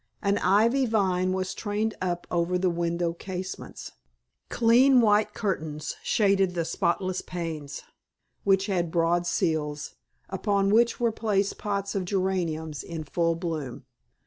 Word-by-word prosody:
An 200 0 +2
ivy 230 +8 +3
vine 185 -4 +1
was 185 0 -2
trained 215 +1 -2
up 175 -1 -2
over 175 +1 +1
the 180 0 +1
window 170 0 -1
casements, 185 +1 -7 0.6
clean 250 +3 +5
white 210 -2 +3
curtains 155 -7 -3
shaded 195 -3 +2
the 170 -1 0
spotless 185 +3 -1
panes, 160 -5 -5 0.6
which 195 -1 +3
had 180 -4 0
broad 170 +1 +1
sills, 150 -3 -1 0.3
upon 195 +1 0
which 235 +2 +3
were 235 -1 +2
placed 205 -3 -1
pots 200 -1 -2
of 195 -2 -1
geraniums 175 -6 -1
in 165 -2 -6
full 165 +2 0
bloom. 160 -7 -5
185 Hz, 130 wpm, -27 LUFS, 170-205 Hz, 0.6 s, clean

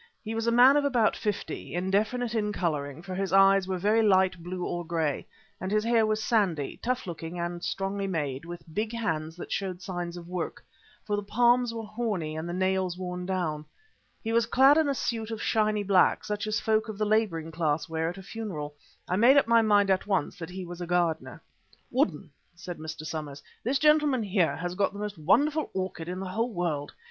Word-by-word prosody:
He 220 0 -4
was 225 +1 -2
a - - +4
man 250 +4 +7
of 290 - +2
about 245 -6 +2
fifty, 210 -4 -4
indefinite 215 +6 0
in 210 -2 0
colouring, 155 -5 -2
for 190 0 -6
his 195 +1 -2
eyes 195 0 +5
were 190 -1 -1
very 210 +5 +3
light 190 -4 +3
blue 180 +1 -4
or 175 0 -3
grey 160 -3 -2 0.3
and 185 - -3
his 215 0 +2
hair 230 -1 +3
was 215 0 0
sandy, 185 - 0
tough 255 +1 -1
looking 170 -1 -6
and 175 0 -4
strongly 195 +1 -2
made, 145 -7 -2
with 175 0 -8
big 215 +3 -1
hands 160 -8 -2
that 175 - -9
showed 185 -3 -2
signs 175 -2 -5
of 170 -1 -9
work, 180 0 -5 0.4
for 210 - 0
the 205 - -1
palms 240 +3 +3
were 230 -1 -5
horny 210 -8 -3
and 160 +2 -4
the - - -3
nails 185 -1 0
worn 180 -1 -5
down. 170 -5 -1 0.6
He 225 0 -2
was 230 -1 +3
clad 270 +4 +6
in 315 -2 +3
a 280 - 0
suit 225 -3 -2
of 225 -1 -4
shiny 215 -1 +1
black, 190 -2 +3
such 210 0 -3
as 215 -1 0
folk 220 +1 +1
of 215 - -6
the 215 - 0
labouring 205 -7 0
class 155 -1 0
wear 160 0 -1
at 175 - -7
a 190 - -9
funeral. 180 -9 -5 0.3
I 180 - 0
made 250 +6 +6
up 280 - +5
my 230 0 +5
mind 205 -2 +4
at 190 +1 +1
once 195 -7 0
that 165 0 -6
he 185 0 -6
was 175 0 -8
a 175 - -4
gardener. 170 -2 -1 0.5
"Woodden," 205 - 0 0.2
said 175 -1 -8
Mr. 155 0 -7
Somers, 150 -3 -6 0.2
"this 260 +5 +1
gentleman 300 -4 +3
here 180 -8 +1
has 175 +3 -4
got 195 +1 0
the 205 - -8
most 210 -3 -5
wonderful 295 - +2
orchid 185 -3 -3
in 180 +1 -4
the 190 -1 -5
whole 225 +6 -1
world. 165 -7 -2
190 Hz, 215 wpm, -28 LUFS, 175-220 Hz, 0.6 s, man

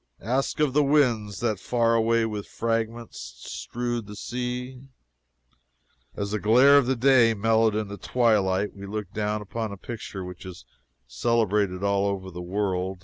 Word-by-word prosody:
Ask 130 +8 -1
of 150 -4 +2
the 150 +1 +4
winds 120 -9 +1
that 110 -5 0
far 115 +2 +1
away 115 0 +2
with 105 -2 -5
fragments 115 0 -3
strewed 120 - -4
the 105 - -9
sea." 125 +3 -5 1.3
As 100 0 -3
the 105 - -1
glare 130 +7 +6
of 130 -2 0
day 125 -3 +5
mellowed 110 +1 +2
into 105 -1 -3
twilight, 105 -5 +1
we 100 0 -9
looked 105 -2 -5
down 105 0 -2
upon 110 +1 -4
a 100 - -7
picture 100 -3 -7
which 90 0 -9
is 95 -2 -10 0.4
celebrated 105 -5 0
all 100 0 +2
over 95 -1 -3
the 90 0 -7
world. 95 0 -2
110 Hz, 150 wpm, -25 LUFS, 100-120 Hz, 1.3 s, glare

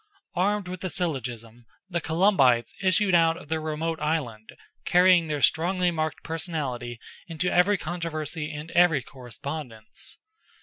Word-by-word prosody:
Armed 200 +2 0
with 180 0 -6
the 185 - -2
syllogism, 120 -9 -4 0.2
the 170 -3 -2
Columbites 155 - +3
issued 190 0 +2
out 165 -1 +4
of 170 -4 -13
their 160 0 -1
remote 160 +1 -2
island, 140 -9 -2 0.3
carrying 180 -2 +5
their 150 -2 -2
strongly 180 +2 +3
marked 155 -3 -3
personality 140 -8 -3 0.3
into 165 +1 -1
every 195 +3 +4
controversy 155 -2 -4
and 150 +2 -7
every 170 -6 +4
correspondence. 125 -2 -7
160 Hz, 130 wpm, -26 LUFS, 140-180 Hz, 0.3 s, carrying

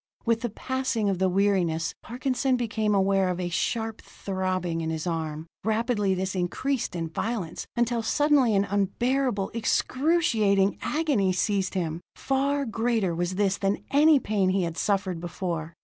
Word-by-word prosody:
With 230 -1 +2
the 240 - -1
passing 255 -2 -1
of 190 -2 -1
the 190 0 +3
weariness, 180 -4 +1
Parkinson 255 +2 0
became 220 -3 0
aware 195 -1 +2
of 180 0 -2
a 180 -1 -2
sharp 225 +5 -2
throbbing 185 -3 -3
in 160 - -2
his 160 0 -3
arm. 160 -2 -3 0.2
Rapidly 220 -2 +1
this 190 +1 -2
increased 215 +6 -1
in 165 -1 -2
violence, 180 0 -4
until 240 0 +1
suddenly 270 -1 +3
an 195 - +3
unbearable, 205 +3 0
excruciating 230 - +2
agony 285 - +1
seized 195 +1 0
him. 165 -2 -2
Far 275 +1 0
greater 225 -5 0
was 175 +2 -2
this 200 0 +1
than 195 0 0
any 295 +1 +6
pain 205 -5 +1
he 190 0 +1
had 165 -1 -3
suffered 190 -3 0
before. 170 -2 -4
200 Hz, 150 wpm, -26 LUFS, 185-240 Hz, 0.2 s, any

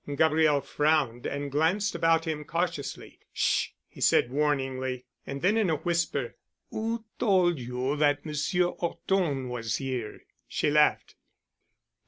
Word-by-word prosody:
Gabriel 155 -1 +3
frowned 145 -7 +1
and 140 0 -4
glanced 175 +8 +1
about 165 0 +2
him 155 -2 -3
cautiously. 165 -1 -3
"Sh——," - - +1 0.2
he - - -14
said 120 - +4
warningly. 130 -3 -1 0.2
And 140 0 -5
then, 205 +5 +3
in 215 -5 +2
a 160 - +2
whisper, 160 -6 -1 0.3
"Who 225 +1 -3
told 180 - +3
you 125 +3 -2
that 145 0 +2
Monsieur 155 +4 +1
'Orton 170 -6 -1
was 115 -2 -2
here?" 130 -5 -4 0.3
She 150 - 0
laughed. 150 0 +3
150 Hz, 130 wpm, -28 LUFS, 135-170 Hz, 0.3 s, said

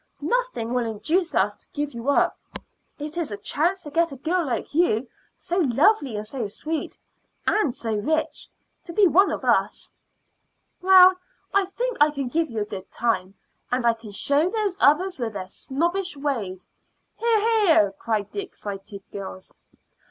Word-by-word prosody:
Nothing 320 - -1
will 245 -2 0
induce 320 - -1
us - - +2
to - - -25
give 290 0 -3
you 235 +3 -3
up. 285 - +3 0.6
It 300 +3 -5
is 335 - -2
a 205 - -4
chance 345 - -1
to 295 - -9
get 335 +1 +2
a - - -6
girl 340 +7 0
like 250 - -3
you, 270 -7 +2 0.3
so 350 - -3
lovely 285 - +3
and 210 0 -4
so 230 -1 -4
sweet 310 +10 -4 0.5
and 320 - +1
so 225 -2 -3
rich, 305 +10 -1 0.4
to 340 - -8
be 410 +3 +5
one 380 +3 +5
of - - -4
us." - - +1 0.9
"Well, 370 0 +8 0.4
I 395 0 +3
think 485 +6 -3
I 295 - +7
can 275 -4 -4
give 325 +4 0
you 225 -2 -3
a - - -1
good 195 -3 -8
time, 205 -5 -1 0.4
and 250 -1 0
I 235 - +5
can 225 -2 -11
show 285 - +1
those 415 -3 -1
others 355 +3 +3
with 230 -3 -2
their 190 -2 -5
snobbish 345 - -2
ways 225 -11 -3 0.3
" - - -48
"Hear, 460 -1 +3 0.3
hear!" 210 - +5
cried 210 0 -3
the 405 - -3
excited 200 - -8
girls. 190 -1 -8
285 Hz, 175 wpm, -24 LUFS, 225-355 Hz, 0.9 s, Well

